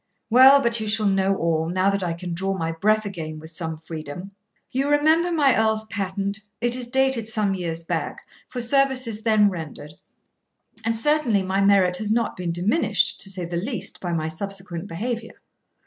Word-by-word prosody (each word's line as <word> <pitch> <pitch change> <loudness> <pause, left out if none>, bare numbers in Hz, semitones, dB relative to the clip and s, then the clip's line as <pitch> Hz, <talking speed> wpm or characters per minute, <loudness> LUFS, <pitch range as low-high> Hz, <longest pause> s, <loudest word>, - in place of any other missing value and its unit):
Well, 265 +3 +8
but 235 0 +1
you 215 - -3
shall 215 0 +3
know 195 0 +2
all, 165 -2 0
now 185 +2 +2
that 200 0 -1
I 175 -2 -1
can 175 +1 -6
draw 190 +3 -1
my 165 -2 -2
breath 215 +6 +1
again 160 -6 -6
with 160 +1 -10
some 160 -1 -4
freedom. 160 +4 -8 0.4
You 270 +3 0
remember 315 +4 +3
my 290 -5 +3
earl's 220 0 +1
patent; 200 0 -3 0.2
it 240 +1 +2
is 250 -1 -3
dated 265 -3 +1
some 215 -3 +1
years 170 -3 -4
back, - - -4 0.2
for 250 - -4
services 255 -3 +1
then 215 -2 +3
rendered; 155 -3 -8 0.9
and 225 0 0
certainly 245 -6 +2
my 190 +1 0
merit 195 -3 +4
has 215 +1 -2
not 230 0 0
been 180 -2 -3
diminished, 190 - +1
to 195 - -4
say 185 -2 -4
the 170 0 -4
least, 200 0 -5
by 175 - -3
my 160 -2 -1
subsequent 190 +1 -5
behaviour. 225 +6 -4
200 Hz, 180 wpm, -23 LUFS, 175-235 Hz, 0.9 s, Well